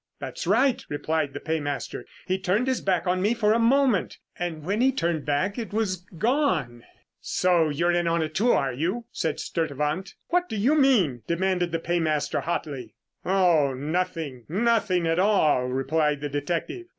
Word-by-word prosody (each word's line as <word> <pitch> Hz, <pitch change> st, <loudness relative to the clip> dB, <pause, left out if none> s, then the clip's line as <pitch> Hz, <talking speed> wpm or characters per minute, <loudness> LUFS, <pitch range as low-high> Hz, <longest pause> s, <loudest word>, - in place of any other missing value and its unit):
"That's -, -, -6 dB
right," 245 Hz, +6 st, +3 dB
replied 150 Hz, -1 st, -1 dB
the 145 Hz, -, -5 dB
paymaster. 145 Hz, -3 st, -3 dB, 0.2 s
"He 185 Hz, 0 st, -1 dB
turned 190 Hz, +6 st, +1 dB
his 260 Hz, -1 st, 0 dB
back 185 Hz, -3 st, 0 dB
on 185 Hz, 0 st, +1 dB
me 210 Hz, +5 st, +2 dB
for 215 Hz, -2 st, +3 dB
a 230 Hz, -, +2 dB
moment, 245 Hz, -3 st, +2 dB, 0.2 s
and 170 Hz, -3 st, -4 dB
when 200 Hz, +7 st, -1 dB
he 265 Hz, +1 st, +4 dB
turned 170 Hz, -, -1 dB
back, 185 Hz, +10 st, 0 dB
it 220 Hz, -3 st, -6 dB
was 210 Hz, -4 st, 0 dB, 0.2 s
gone." 185 Hz, -, 0 dB, 0.4 s
"So 175 Hz, -3 st, +2 dB
you're 170 Hz, +4 st, +1 dB
in 175 Hz, -1 st, +1 dB
on 165 Hz, 0 st, +1 dB
it 155 Hz, 0 st, -5 dB
too, 235 Hz, +7 st, +3 dB
are 135 Hz, -2 st, +1 dB
you?" 180 Hz, -, -2 dB
said 160 Hz, -, -2 dB
Sturtevant. 155 Hz, +3 st, -2 dB
"What 355 Hz, +1 st, +1 dB
do -, -, -4 dB
you 240 Hz, +9 st, +3 dB
mean?" 230 Hz, -, +3 dB
demanded 180 Hz, 0 st, 0 dB
the 165 Hz, -, 0 dB
paymaster 165 Hz, -3 st, 0 dB
hotly. 140 Hz, -9 st, -4 dB, 0.3 s
"Oh 175 Hz, -8 st, +3 dB
nothing, 150 Hz, -3 st, -3 dB
nothing 200 Hz, -2 st, +1 dB
at 165 Hz, +1 st, +1 dB
all," 170 Hz, -10 st, +3 dB
replied 145 Hz, +3 st, 0 dB
the 145 Hz, -, -3 dB
detective. 170 Hz, -, -3 dB
175 Hz, 170 wpm, -25 LUFS, 150-210 Hz, 0.4 s, he